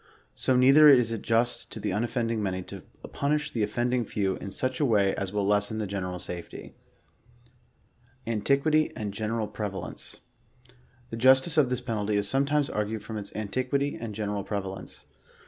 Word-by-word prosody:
So 130 Hz, -, +1 dB
neither 135 Hz, +4 st, +7 dB
is 125 Hz, -5 st, +5 dB
it 115 Hz, -, -3 dB
just 115 Hz, +1 st, 0 dB
to -, -, -7 dB
the 105 Hz, -1 st, -2 dB
unoffending 115 Hz, +1 st, -1 dB
many, 95 Hz, -2 st, -2 dB
to -, -, -9 dB, 0.3 s
punish 150 Hz, +1 st, 0 dB
the 115 Hz, -, -1 dB
of 105 Hz, -, +1 dB
fending 120 Hz, +2 st, 0 dB
few 100 Hz, -3 st, -1 dB
in -, -, -7 dB
such 130 Hz, +6 st, -2 dB
a -, -, +2 dB
way 105 Hz, -7 st, +3 dB
as 95 Hz, -2 st, -3 dB
will 105 Hz, -1 st, -1 dB
lessen 105 Hz, +2 st, +1 dB
the 110 Hz, -, -2 dB
general 95 Hz, -2 st, -4 dB
safety. 90 Hz, -1 st, -8 dB, 1.5 s
ANTIQUITY 140 Hz, +8 st, +2 dB
AND 105 Hz, -4 st, -4 dB
GENERAL 110 Hz, +1 st, -2 dB
PREVALENCE. 100 Hz, -3 st, -6 dB, 0.9 s
The 115 Hz, -, -4 dB
justice 130 Hz, +6 st, +5 dB
of 135 Hz, -4 st, +3 dB
this 125 Hz, 0 st, -1 dB
penalty 105 Hz, -4 st, -2 dB
is 100 Hz, -1 st, +1 dB
sometimes 140 Hz, +4 st, +1 dB
argued 105 Hz, -2 st, -3 dB
from 110 Hz, 0 st, -6 dB
its 100 Hz, -, -7 dB
anti 110 Hz, +4 st, -2 dB
quity 140 Hz, +2 st, -1 dB
and 110 Hz, -3 st, -5 dB
general 105 Hz, -1 st, -2 dB
prevalence. 95 Hz, -2 st, -6 dB
110 Hz, 170 wpm, -27 LUFS, 100-130 Hz, 1.5 s, neither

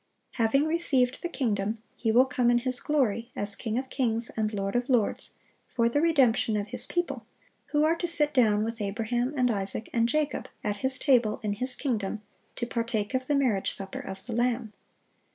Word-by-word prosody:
(707) 235 Hz, +5 st, +3 dB
Having -, -, 0 dB
received 275 Hz, -7 st, +1 dB
the 345 Hz, -, -3 dB
kingdom, 215 Hz, -7 st, -1 dB, 0.2 s
He 225 Hz, -, 0 dB
will 250 Hz, +4 st, +6 dB
come 250 Hz, -2 st, +1 dB
in 240 Hz, -, +4 dB
His 255 Hz, +1 st, 0 dB
glory, 240 Hz, -6 st, 0 dB
as 205 Hz, 0 st, 0 dB
King 225 Hz, -1 st, -3 dB
of 260 Hz, 0 st, -4 dB
kings 230 Hz, -3 st, 0 dB
and 215 Hz, -1 st, 0 dB
Lord 195 Hz, -1 st, -3 dB
of 245 Hz, +2 st, 0 dB
lords, 240 Hz, -5 st, 0 dB, 0.4 s
for 235 Hz, -2 st, +3 dB
the 290 Hz, +5 st, +1 dB
redemption 255 Hz, -9 st, +3 dB
of 205 Hz, 0 st, -3 dB
His 250 Hz, -, -3 dB
people, 350 Hz, 0 st, -2 dB, 0.4 s
who 295 Hz, 0 st, +1 dB
are 320 Hz, +2 st, +3 dB
to 345 Hz, -, -2 dB
"sit 300 Hz, -3 st, +3 dB
down 215 Hz, -5 st, +4 dB
with 230 Hz, 0 st, -4 dB
Abraham, 225 Hz, +5 st, -1 dB
and 250 Hz, -1 st, +3 dB
Isaac, 200 Hz, +1 st, -3 dB
and 230 Hz, 0 st, +2 dB
Jacob," 300 Hz, +2 st, -1 dB
at 205 Hz, -1 st, -1 dB
His 260 Hz, +4 st, -1 dB
table 245 Hz, -6 st, +3 dB
in 210 Hz, -1 st, 0 dB
His 255 Hz, +5 st, -2 dB
kingdom,(708) 215 Hz, -5 st, -5 dB
to 240 Hz, -, -2 dB
partake 230 Hz, -3 st, -2 dB
of 260 Hz, 0 st, -1 dB
the 290 Hz, -, +2 dB
marriage 245 Hz, -9 st, +1 dB
supper 195 Hz, -1 st, -6 dB
of 190 Hz, 0 st, -8 dB
the 235 Hz, -, -5 dB
Lamb. 240 Hz, -2 st, 0 dB
240 Hz, 200 wpm, -28 LUFS, 215-260 Hz, 0.4 s, will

